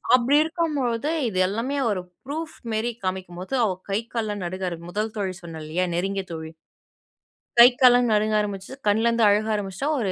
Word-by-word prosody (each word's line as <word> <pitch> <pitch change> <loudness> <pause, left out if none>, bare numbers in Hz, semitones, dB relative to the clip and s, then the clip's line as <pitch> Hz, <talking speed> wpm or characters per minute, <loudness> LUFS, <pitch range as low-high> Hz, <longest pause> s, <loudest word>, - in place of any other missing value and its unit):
அப்படி 255 +3 +3
இருக்கும் 325 -1 -2
பொழுது, 240 +2 -1 0.2
இது 185 -3 -2
எல்லாமே 230 +8 -2
ஒரு 195 -4 -1 0.2
ப்ரூஃப் 315 +3 -5 0.2
மேரி 220 +2 0
காமிக்கும்போது, 185 +2 -4
அவ 215 - +2 0.2
கை 200 +1 +1
கால்லாம் 210 -4 -2
நடுங்க 185 +1 -3
ஆரம்பி 170 0 -8
1 215 +3 -2
தோழி 190 -3 -2
சொன்னேன் 165 -2 -8
இல்லையா? 170 +4 -1
நெருங்கிய 195 +2 -1
தோழி. 160 -1 -6 1.1
கை 235 +1 +11
கால்லாம் 245 -1 +6
நடுங்க 215 0 +2
ஆரம்பிச்சு, 200 -1 -4 0.2
கண்லருந்து 230 +2 +3
அழுக 210 +1 +3
ஆரம்பிச்சுட்டா, 200 +5 -3
ஒரு 200 -5 0
210 Hz, 165 wpm, -24 LUFS, 185-235 Hz, 1.1 s, கை